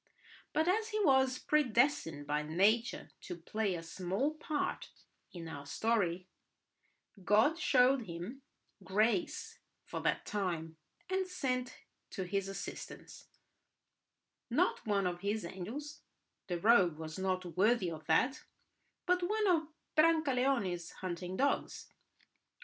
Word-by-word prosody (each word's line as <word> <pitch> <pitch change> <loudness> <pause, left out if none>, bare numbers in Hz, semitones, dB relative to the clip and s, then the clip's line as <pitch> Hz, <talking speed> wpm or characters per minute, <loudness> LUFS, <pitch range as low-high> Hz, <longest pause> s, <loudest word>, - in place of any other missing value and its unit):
But 315 +2 +1
as 435 +4 +2
he 430 -1 -1
was 265 -2 +4
predestined 240 - +2
by 150 +1 0
nature 200 +10 +1
to 180 - -6
play 195 +3 -2
a 165 - -6
small 190 - -1
part 305 -1 -3 0.4
in 170 -2 -8
our 140 -3 -8
story, 185 -5 0 1.0
God 220 - +4
showed 255 - +4
him 180 +11 -6 0.4
grace 215 - 0 0.3
for - - -5
that - - 0
time, 170 -6 -3 0.3
and 375 0 0
sent 255 -8 -2 0.3
to 190 - -4
his 195 +1 -1
assistance—not 195 - -8 1.6
one 200 -2 +2
of 175 -1 -1
His 205 -1 -1
angels, 235 +12 -6 0.5
the 175 -2 -2
rogue 185 -6 +5
was 160 +2 -6
not 185 -2 -2
worthy 200 -2 +3
of 155 -1 -8
that, 265 +3 +2 0.6
but—one 360 +4 +1
of 325 -4 +3 0.3
Brancaleone's 270 - +2
hunting 180 0 -5
dogs. 280 +1 -1
210 Hz, 115 wpm, -34 LUFS, 180-275 Hz, 1.6 s, rogue